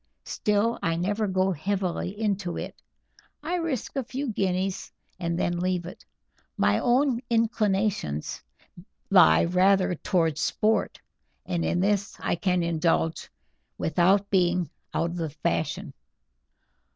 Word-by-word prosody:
Still, 210 +2 0
I 165 0 0
never 205 +5 -1
go 190 0 +1
heavily 185 +2 -2
into 200 -5 -1
it. - - -6 0.7
I 325 +4 -3
risk 325 -9 -3
a 270 - -1
few 265 +3 -4
guineas 190 -1 -1 0.3
and 170 -1 -2
then 175 0 0
leave 180 -1 -1
it. 180 - -10 0.5
My - - +3
own 250 0 +2
inclinations 210 - 0 0.7
lie 80 0 +6
rather 185 +2 +3
towards 165 -2 0
sport, 220 +1 0 0.5
and 175 -2 -1
in 175 - 0
this 200 0 0
I - - -1
can 180 0 0
indulge 165 -1 0 0.5
without 185 +5 +2
being 180 -2 +2 0.2
out 170 +1 -1
of 175 - -6
the 165 -2 -2
fashion. 85 - -2
185 Hz, 125 wpm, -26 LUFS, 170-210 Hz, 0.7 s, lie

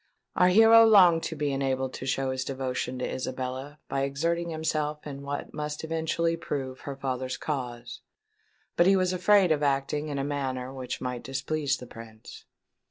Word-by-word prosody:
Our 180 - +5
hero 225 +4 +8
longed 185 -7 +6
to 160 - -4
be 145 -1 -1
enabled 130 -1 -1
to 130 - -6
show 135 0 0
his 130 0 -2
devotion 130 -1 -3
to 125 - -2
Isabella 130 +3 -5
by 135 - -1
exerting 165 +5 -1
himself 155 -2 -2
in 140 -2 -7
what 140 0 -5
must 150 0 -4
eventually 165 +1 0
prove 135 -5 -5
her 140 - -6
father's 130 -1 -3
cause; 120 -4 -5 0.7
but 175 - +4
he 195 - +6
was 185 -1 +1
afraid 185 0 +4
of 150 -1 +2
acting 140 +1 0
in 145 - -3
a 135 - -1
manner 135 -2 -3
which 130 -2 -5
might 125 -1 -3
displease 140 +1 -1
the 125 - -10
Prince. 115 -2 -12
140 Hz, 170 wpm, -27 LUFS, 130-160 Hz, 0.7 s, hero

